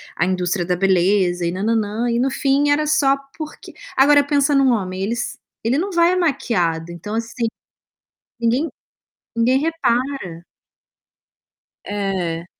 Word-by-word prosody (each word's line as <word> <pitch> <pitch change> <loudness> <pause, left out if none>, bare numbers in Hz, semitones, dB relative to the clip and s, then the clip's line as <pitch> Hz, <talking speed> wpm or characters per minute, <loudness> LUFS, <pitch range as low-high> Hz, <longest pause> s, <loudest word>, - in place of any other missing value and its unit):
a 170 - +1
indústria 180 0 0
da 180 +1 0
beleza 185 -1 +2
e 170 - 0
nã 190 +3 -4
nã 230 +1 +2
nã. 220 +2 -1
E 235 - +1
no 265 +2 +2
fim 275 +2 +1
era 295 +1 +2
só 275 -2 +3 0.2
porque 310 -1 -9 0.2
agora 285 +2 +6
pensa 285 0 +2
em 275 - +4
um 265 -2 +4
homem. 190 -4 -2
Eles 235 +4 -3 0.2
ele 250 +6 +1
não 390 +3 -2
vai 340 -1 +4
é 365 - +1
maquiado, 180 - 0
então 205 +6 -6
assim, 230 +1 -2 0.9
ninguém 245 +7 +1 0.7
ninguém 250 +3 +3
repara. 260 - -1 1.4
É. 185 -5 -2
230 Hz, 150 wpm, -20 LUFS, 185-280 Hz, 1.4 s, agora